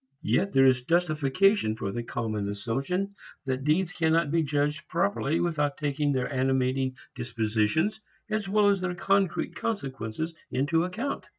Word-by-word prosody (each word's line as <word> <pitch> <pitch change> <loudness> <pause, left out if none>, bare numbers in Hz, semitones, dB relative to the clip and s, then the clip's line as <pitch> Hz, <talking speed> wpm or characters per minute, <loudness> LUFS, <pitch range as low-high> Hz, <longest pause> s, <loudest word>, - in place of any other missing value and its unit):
Yet 125 - +1
there 135 0 +6
is 130 -2 +4
justification 165 - +2
for 100 -3 -3
the 120 - -3
common 110 -3 -3
assumption 135 - -2 0.3
that 130 0 -2
deeds 165 +5 +2
cannot 165 -3 +2
be 165 0 +3
judged 150 0 -1
properly 170 -3 0
without 150 -4 0
taking 145 0 0
their 130 0 -1
animating 130 0 +1 0.2
disposition 115 - 0 0.4
as 215 -2 -2
well 205 0 +4
as 200 -2 +2
their 180 -1 -2
concrete 195 +1 +1
consequences 140 - -3 0.2
into 150 +6 +1
account. 225 +10 -4
145 Hz, 140 wpm, -27 LUFS, 130-180 Hz, 0.4 s, there